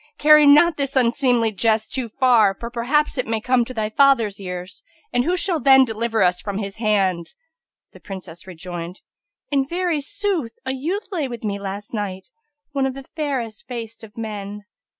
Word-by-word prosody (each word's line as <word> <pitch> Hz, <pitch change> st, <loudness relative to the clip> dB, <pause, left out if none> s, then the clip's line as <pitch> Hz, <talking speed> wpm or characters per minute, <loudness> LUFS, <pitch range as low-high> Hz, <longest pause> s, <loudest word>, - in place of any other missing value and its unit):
carry 300 Hz, 0 st, +7 dB
not 295 Hz, +3 st, +6 dB
this 275 Hz, -1 st, -2 dB
unseemly 245 Hz, -2 st, +2 dB
jest 220 Hz, +1 st, 0 dB
too 255 Hz, -3 st, -3 dB
far; 225 Hz, -5 st, +4 dB
for 235 Hz, 0 st, -6 dB
perhaps 265 Hz, +5 st, 0 dB
it 250 Hz, -, -1 dB
may 225 Hz, 0 st, 0 dB
come 250 Hz, +2 st, +2 dB
to 235 Hz, -, -8 dB
thy 220 Hz, -4 st, -2 dB
father's 225 Hz, -4 st, +3 dB
ears, 180 Hz, 0 st, -7 dB, 0.3 s
and 245 Hz, +1 st, +2 dB
who 360 Hz, +2 st, +1 dB
shall 355 Hz, -2 st, 0 dB
then 265 Hz, -2 st, +6 dB
deliver 225 Hz, -2 st, 0 dB
us 180 Hz, 0 st, +2 dB
from 200 Hz, -1 st, -4 dB
his 200 Hz, -1 st, -5 dB
hand?" 195 Hz, -6 st, 0 dB, 0.6 s
The -, -, -15 dB
Princess 185 Hz, -3 st, -9 dB
rejoined, 175 Hz, 0 st, -7 dB, 0.5 s
"In 275 Hz, -1 st, +3 dB
very 345 Hz, -2 st, -1 dB
sooth 380 Hz, -, -2 dB
a 260 Hz, -, -1 dB
youth 330 Hz, +11 st, -3 dB
lay 320 Hz, -7 st, -1 dB
with 240 Hz, -3 st, -8 dB
me 200 Hz, -2 st, -2 dB
last 200 Hz, +2 st, -6 dB
night, 195 Hz, -3 st, -4 dB, 0.4 s
one 275 Hz, -2 st, 0 dB
of 265 Hz, -, -5 dB
the 275 Hz, -, -8 dB
fairest 260 Hz, -8 st, -4 dB
faced 230 Hz, -2 st, -7 dB
of 220 Hz, 0 st, -13 dB
men." 210 Hz, -2 st, -6 dB
230 Hz, 180 wpm, -21 LUFS, 205-275 Hz, 0.6 s, carry